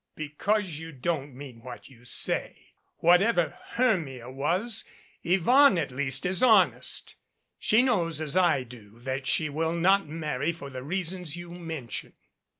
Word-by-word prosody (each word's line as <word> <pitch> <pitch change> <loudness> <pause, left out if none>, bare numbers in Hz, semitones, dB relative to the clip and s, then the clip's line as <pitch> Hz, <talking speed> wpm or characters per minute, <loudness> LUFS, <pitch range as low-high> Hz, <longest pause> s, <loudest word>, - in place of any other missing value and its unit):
"Because 160 +3 -1
you 165 0 -8
don't 145 -1 -3
mean 130 -4 -10
what 125 +1 -10
you 125 -3 -18
say. 125 - -3 0.3
Whatever 175 +1 +4 0.2
Hermia 160 - 0
was 175 - -1 0.4
Yvonne 195 - +5
at 150 -5 -1
least 135 0 0
is 180 0 +1
honest. 220 -7 +3 0.5
She 220 +3 +4
knows 170 - +1
as 155 0 -3
I 175 -8 +3
do 115 -3 -14
that 135 +1 -4
she 155 - +1
will 160 +3 -1
not 190 +2 +3
marry 155 -1 -2
for 140 -4 -9
the 130 0 -6
reasons 175 +1 -3
you 175 0 -9
mention." 160 -8 -6
165 Hz, 145 wpm, -27 LUFS, 135-185 Hz, 0.5 s, Yvonne